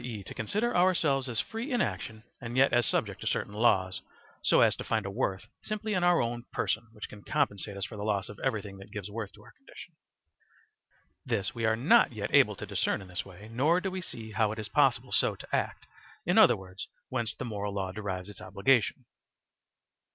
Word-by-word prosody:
e., 110 -5 -5
to - - -8
consider 210 - -1
ourselves 160 -7 +3
as 115 -3 -1
free 230 +6 -3
in 245 - +2
action 110 - -2 0.2
and 120 0 -5
yet 135 +1 +5
as 120 -3 +4
subject - - 0
to - - -4
certain 100 - -1
laws, 95 -4 +2 0.4
so - - +4
as - - +5
to - - -6
find 110 -3 0
a 100 - -3
worth 100 -3 -1 0.2
simply 215 0 -3
in 180 -2 +1
our 175 -1 +5
own 120 0 -1
person 115 +1 -1
which 105 - -7
can 105 - -12
compensate 100 -7 -1
us 100 - -2
for 110 - -8
the 100 - -4
loss 105 -2 0
of 105 - -10
everything 100 -3 -2
that 95 - -12
gives 105 -1 -6
worth 105 -2 -5
to - - -17
our - - -15
condition; - - -13 1.3
this 110 -6 -1
we 115 -1 -2
are 110 0 +3
not 160 - +5
yet 105 -1 -4
able 130 -8 +6
to 105 - -6
discern 100 0 0
in 95 -2 -11
this 90 - -3
way, 95 +2 -12
nor 150 +9 +3
do 190 +1 -3
we 185 0 -4
see 110 -9 -7
how 110 -1 +2
it 110 - -5
is 110 -1 -5
possible - - +2
so - - +3
to - - -4
act - - -2 0.4
in - - +2
other - - +7
words, 95 0 -9 0.2
whence 120 -4 -2
the 130 - -5
moral 105 -3 -3
law 95 -2 -2
derives 95 -3 -4
its 105 -2 -11
obligation. 115 +6 +2
110 Hz, 215 wpm, -30 LUFS, 100-130 Hz, 1.3 s, other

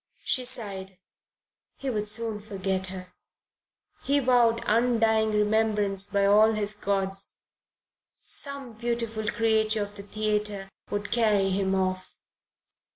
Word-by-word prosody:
She 255 -2 +1
sighed; 195 -6 -1 0.8
he 275 -1 -3
would 210 -2 -2
soon 220 -1 0
forget 190 -2 -3
her. 185 -1 -9 0.9
He 280 +1 +1
vowed 245 -3 +3
undying 225 -1 +2
remembrance 210 -2 +1
by 200 -1 +1
all 215 +2 +5
his 210 -1 -2
gods. 195 -1 -2 0.9
Some 280 -4 +1
beautiful 230 -1 -3
creature 220 -1 +1
of 205 0 -8
the 200 - -6
theatre 210 -1 -2 0.2
would 205 0 -4
carry 210 -5 +2
him 190 0 0
off. 185 -1 -2
210 Hz, 115 wpm, -27 LUFS, 200-225 Hz, 0.9 s, all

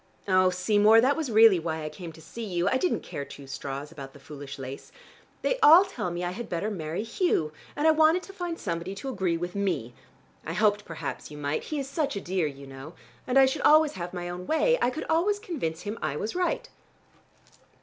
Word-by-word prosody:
Oh, 185 -1 +4
Seymour, 205 +4 +4
that 265 +5 +3
was 315 -5 -3
really 220 -4 +7
why 160 -1 -3
I 155 - -3
came 170 +1 -9
to 160 - -14
see 230 +9 -8
you. 180 -4 -1
I 260 - +3
didn't 360 +7 0
care 140 - -5
two 140 0 -11
straws 135 +2 -6
about 140 -4 -9
the 140 - -14
foolish 140 0 -9
lace. 135 0 -8 0.5
They - - +1
all 340 +2 +8
tell 380 - -4
me 175 +1 -4
I 175 - -1
had 235 +5 -7
better 180 +5 -2
marry 165 0 -3
Hugh, 225 - 0 0.2
and 295 - -1
I - - +8
wanted 315 +3 +4
to 390 - -11
find 350 -3 -4
somebody 170 - -4
to 270 +7 -6
agree 190 -8 0
with 175 +1 -4
me. 170 - -2 0.5
I 165 - -4
hoped 210 +2 +2
perhaps 165 -2 -6
you 150 - -10
might. 145 +1 -2
He 305 - -4
is 275 -2 -3
such 280 -1 -2
a - - -2
dear, 180 -3 -1
you 140 -1 -9
know, 135 +4 -10 0.3
and 255 +1 +2
I 270 - +8
should 265 +3 -1
always 310 0 +6
have 175 -1 -6
my 175 -1 -5
own 180 +1 -6
way: - - +3
I - - +3
could 260 +5 -5
always 350 +6 +2
convince 300 - -4
him 210 +2 -5
I 150 -2 -2
was 210 +8 -3
right." 365 +7 -1
185 Hz, 225 wpm, -27 LUFS, -, 0.5 s, all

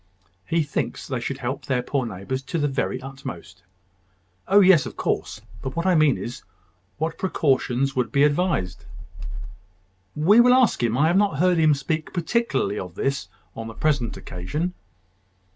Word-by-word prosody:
"He 165 -1 +2
thinks 145 - -3
they 130 -3 -2
should 130 +3 -4
help 135 +1 -4
their 125 -2 0
poor 130 -1 -1
neighbours 110 +6 -4
to 135 +5 -4
the 145 -2 +1
very 135 -2 -2
utmost." 95 -9 -9 0.9
"Oh, 200 +2 +6
yes; 185 -6 +6
of - - -10
course: - - -2 0.2
but 130 - -5
what 170 +1 -2
I 185 - +4
mean 155 -4 +4
is, 120 +1 -6 0.6
what 160 +2 -3
precautions 135 -6 +1
would 125 -3 0
be 140 - +3
advise?" 145 - +1 1.4
"We 185 +10 +5
will 250 +1 +6
ask 255 -5 +3
him. 120 0 +1
I 145 - +4
have 170 +3 +3
not 200 -7 +2
heard 180 +1 +3
him 155 -2 +5
speak 155 +3 -3
particularly 165 - 0
of 90 -2 -7
this 135 +4 -1 0.3
on 115 0 -6
the 110 - -9
present 140 -7 0
occasion." 150 - -4
140 Hz, 165 wpm, -24 LUFS, 125-165 Hz, 1.4 s, Oh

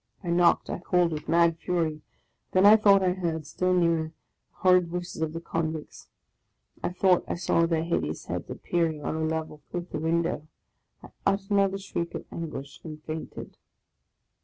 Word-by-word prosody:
I 175 - -2
knocked, 175 0 +4
I - - -4
called 180 -1 +2
with 155 -1 -5
mad 170 0 +4
fury. 165 -4 -1 0.5
Then 185 +1 +5
I 210 +1 +10
thought 200 -3 +5
I 180 -1 +3
heard, 165 -4 -3
still 185 0 -1
nearer, 170 -3 +3 0.4
the - - -40
horrid 180 -1 +4
voices 175 -1 -5
of 160 -1 0
the 165 - -5
convicts. 160 -2 -4 0.7
I - - -1
thought 180 0 +3
I - - -2
saw 170 -1 +2
their 165 -1 +1
hid 170 +1 0
eous 75 +1 -5
heads - - -4
appearing 160 -4 -1
on - - -1
a 160 - -1
level 160 -1 -3
with 175 0 -5
the - - -3
window; 165 -1 0 0.6
I - - -11 0.2
uttered 195 0 0
another 195 -1 +3
shriek 180 -3 -4
of - - -5
anguish, 140 -4 -6
and 155 -2 -8
fainted. 155 0 -7
170 Hz, 180 wpm, -27 LUFS, 160-180 Hz, 0.7 s, I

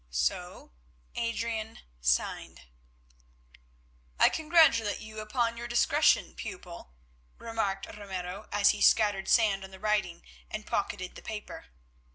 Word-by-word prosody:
So 60 0 -2 0.4
Adrian 230 -1 -3 0.2
signed. 60 0 -1 1.6
"I - - +7
congratulate 310 -10 +3
you 215 0 -9
upon 230 +2 -1
your 240 0 -5
discretion, 240 0 +3
pupil," 65 - -9 0.4
remarked 220 -4 -2
Ramiro, 195 -1 -7
as 205 0 +5
he 210 - -6
scattered 205 -3 +4
sand 205 -4 +3
on 190 - -9
the 190 0 -13
writing 210 -5 -1 0.3
and 215 0 -6
pocketed 185 -2 -3
the - - -11
paper. 215 -1 -7
215 Hz, 115 wpm, -29 LUFS, 195-230 Hz, 1.6 s, I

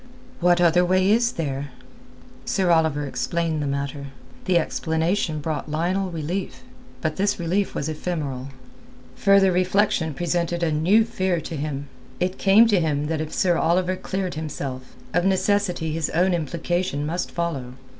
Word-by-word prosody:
"What 175 0 +4
other 175 0 +4
way 185 +2 +3
is 235 +2 +3
there?" 140 -3 -3 0.7
Sir 195 -7 +1
Oliver 160 -3 +2
explained 165 +2 -1
the 145 - -2
matter. 140 0 -3 0.4
The 185 -2 +3
explanation 160 0 0
brought 155 0 -3
Lionel 180 +5 0
relief. 170 +3 -4 0.4
But 155 -1 -2
this 200 +1 +1
relief 185 +4 -1
was 140 - -2
ephemeral. 150 -5 -3 0.7
Further 195 -1 +5
reflection 180 -3 +1
presented 175 0 -1
a 165 - +1
new 185 +9 +4
fear 190 -6 -1
to 160 - -6
him. 145 -1 -4 0.3
It 180 +1 -1
came 205 +4 +6
to 205 -4 +4
him 150 -3 0
that 160 -1 -1
if 155 - -5
Sir 185 -8 +2
Oliver 180 +3 +2
cleared 190 0 -3
himself, 140 -4 -6 0.2
of 175 - +2
necessity 190 -4 +1
his 160 -1 -1
own 180 +2 +2
implication 170 -1 -1
must 170 +4 -2
follow. 150 -8 -3
170 Hz, 150 wpm, -23 LUFS, 155-185 Hz, 0.7 s, came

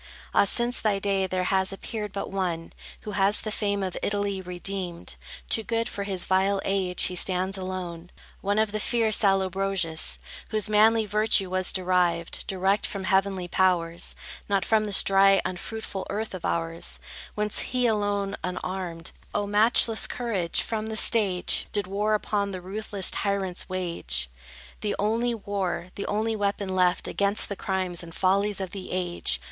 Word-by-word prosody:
Ah, - - +5
since 240 +4 +3
thy 210 -2 +1
day, 195 -1 0
there 185 0 -1
has 190 +1 +1
appeared 210 +1 -5
but 195 0 -4
one, 175 -4 -2 0.3
Who 210 - -6
has 195 +1 +4
the 215 - -4
fame 200 -2 -1
of 185 -2 -3
Italy 200 -1 -1
redeemed: 180 -1 -4 0.3
Too 225 - +1
good 230 +1 -1
for 200 - -4
his 190 -3 -1
vile 190 +1 +2
age, 190 -2 +1
he 180 - 0
stands 185 +1 0
alone; 180 -2 -5 0.3
One 200 +1 0
of 215 -1 +2
the 215 - -2
fierce 225 -1 +2
Allobroges, 190 -4 +1 0.3
Whose 215 -1 +1
manly 220 +1 +4
virtue 210 -2 +2
was 185 0 +1
derived 180 -2 +1
Direct 195 +2 +1
from 195 -1 -5
heavenly 190 -1 +1
powers, 175 -2 +1 0.3
Not 195 -2 +1
from 220 -1 +3
this 205 -2 +2
dry, 195 0 +5
unfruitful 195 +2 -5
earth 215 +1 -3
of 185 -3 -6
ours; 165 0 -2 0.4
Whence 210 0 +1
he 250 0 0
alone, 205 -3 0
unarmed,— 180 -2 -3 0.2
O 205 - +1
matchless 220 +2 +4
courage!—from 220 0 -1
the 220 0 -3
stage, 200 -6 +4
Did 205 -2 -1
war 205 +3 +1
upon 205 -1 -1
the 185 -2 -5
ruthless 200 +1 -2
tyrants 195 -3 -1
wage; 120 - -2 0.5
The 210 -1 -1
only 230 +3 +1
war, 185 -4 -3
the 200 - -5
only 220 +2 0
weapon 200 -1 -1
left, 180 0 +2
Against 200 +3 +1
the 200 - -3
crimes 185 -3 -1
and 165 -1 -10
follies 200 +2 +2
of 190 -2 -4
the 195 -2 -7
age. 175 - -1
195 Hz, 160 wpm, -26 LUFS, 185-210 Hz, 0.5 s, Ah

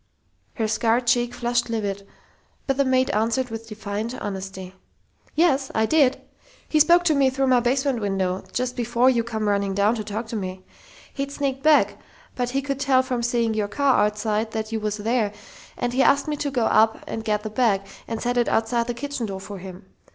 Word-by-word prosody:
Her 225 -4 0
scarred 230 +2 +1
cheek 240 0 +2
flushed 240 0 -1
livid, 200 -3 -3 0.6
but 270 -1 0
the 280 - +4
maid 260 0 +2
answered 230 +4 0
with 225 0 -6
defiant 215 +2 -4
honesty: 190 -1 -6 0.6
"Yes, 280 -5 +2
I 220 - +3
did! 275 0 +3 0.5
He 310 - +2
spoke 345 +3 +6
to 335 -3 +3
me 275 -2 +3
through 270 +1 0
my 255 -2 +4
basement 260 0 0
window 190 -2 -1
just 250 +2 -2
before 240 +2 +2
you 235 -2 +1
come 220 -2 -3
running 200 -1 0
down 205 +2 +3
to 220 -3 -3
talk 215 +3 -4
to 230 - -4
me. 185 -2 -5 0.5
He'd 275 0 -3
sneaked 275 -2 -2
back, 305 +1 +4 0.4
but 245 -1 -1
he 270 +2 -1
could 275 -1 -3
tell 270 -2 +3
from 255 -2 -2
seeing 235 -1 +1
your 215 -1 -1
car 260 +1 +2
outside 210 +1 -1
that 220 0 -3
you 225 - -1
was 210 0 -2
there, 220 -1 0 0.4
and 245 0 -2
he 260 - +2
asked 280 +2 +3
me 300 - -1
to 285 - -2
go 250 -5 0
up 220 0 +3
and 225 - -5
get 210 -1 -1
the 215 - -5
bag 215 -4 +2 0.3
and 225 -1 -3
set 245 +1 -1
it 240 - +2
outside 230 +1 +1
the 240 - -3
kitchen 260 -2 -4
door 195 -1 -5
for 195 0 -8
him. 185 0 -10
235 Hz, 205 wpm, -23 LUFS, 210-260 Hz, 0.6 s, spoke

